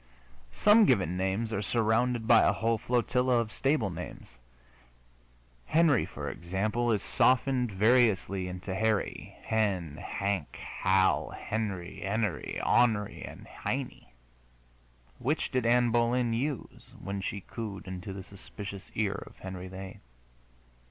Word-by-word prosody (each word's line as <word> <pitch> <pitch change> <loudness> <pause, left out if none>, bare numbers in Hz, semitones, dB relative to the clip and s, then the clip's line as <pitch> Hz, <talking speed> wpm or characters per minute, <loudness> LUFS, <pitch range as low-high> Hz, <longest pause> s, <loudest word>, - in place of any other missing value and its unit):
Some 210 +1 +6
given 95 - +2
names 95 +5 -1
are 100 - -1
surrounded 115 +2 +1
by 115 -2 +7
a - - +4
whole 115 +1 0
flotilla 125 +1 +1
of 115 -2 -1
stable 135 -8 +1
names. 90 +1 -8 1.4
Henry, 160 -7 +3
for - - -6
example, 105 +7 -1
is 105 -3 0
softened 125 -1 +2
variously 100 -3 +3
into 90 +1 -5
Harry, 110 +1 -1
Hen, 95 -9 0
Hank, 100 -6 -3
Hal, 95 0 +1
Henny, 100 -3 -4
Enery, 105 -1 -1
On'ry 110 -4 +2
and - - -9
Heinie. - - -5 1.1
Which 150 +5 -1
did 125 -3 +1
Ann 120 0 +4
Boleyn 120 0 +2
use 135 +3 -4
when 100 +1 -4
she 100 +1 -4
cooed 105 -1 -7
into 95 +1 -6
the 95 0 -7
suspicious 100 0 -9
ear 100 -2 -1
of - - -15
Henry 95 -1 -7
VIII.? 95 0 -8
110 Hz, 125 wpm, -29 LUFS, 95-120 Hz, 1.4 s, by